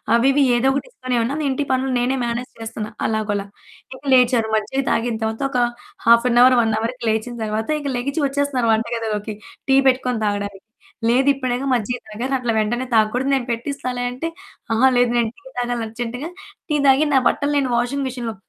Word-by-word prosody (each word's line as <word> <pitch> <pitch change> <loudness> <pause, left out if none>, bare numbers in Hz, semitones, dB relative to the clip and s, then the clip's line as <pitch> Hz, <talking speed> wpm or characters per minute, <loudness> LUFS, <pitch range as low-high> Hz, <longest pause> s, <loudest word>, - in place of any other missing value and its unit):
అవి 250 +3 +4
ఇవి 285 - +4
ఏదో 255 - +2
ఒకటి 280 - -3
ఇస్తనే 255 - -3
ఉన్నాను. 285 +6 -2
ఇంటి 280 +2 -1
పనులు 260 +1 0
నేనే 255 +2 0
మేనేజ్ 240 +1 -3
చేస్తున్నా 220 -1 -5 0.2
అలాగోలా. 205 -2 -1 0.5
ఇక 260 - -15
లేచారు 245 -3 +3
మజ్జిగ 240 +5 -1
తాగిన 230 -1 0
తరువాత 220 +4 -2
ఒక 250 - 0 0.5
హాఫ్ 235 +1 +6
ఎన్ 240 - +4
హౌర్, 255 0 +7
1 225 -1 +1
హౌర్‌కి 235 +2 -4
లేచిన 220 +2 -1
తరువాత, 220 +4 -2
ఇక 285 - -4
లెగిచి 280 +6 -2
వచ్చేస్తున్నారు 275 -4 0
వంటగదిలోకి 220 -2 -2 0.3
టీ 270 - +6
పెట్టుకొని 250 -3 -1
తాగడానికి. 205 -1 -3 0.4
లేదిప్పుడేగా 260 +1 +2
మజ్జిగ 245 0 0
తాగారు 240 +6 -4
అట్లా 245 -2 -1
వెంటనే 240 +4 0
తాగకూడదు 230 +4 +2
నేను 265 -3 +1
పెట్టిస్తాలే 250 +1 -3
అంటే, 255 +7 -4 0.5
"ఆహా! 240 +4 +5
లేదు 245 -1 +3
నేను 235 - +2
టీ 290 - -21
తాగాలి 245 -1 -1
అర్జెంట్‌గా 240 +6 -5 0.4
టీ 300 - +1
తాగి, 270 +2 +5
నా - - +6
బట్టలు 290 0 +1 0.2
వాషింగ్ 255 +4 0
మెషిన్‌లో" 240 -3 -4
245 Hz, 170 wpm, -21 LUFS, 225-265 Hz, 0.5 s, హౌర్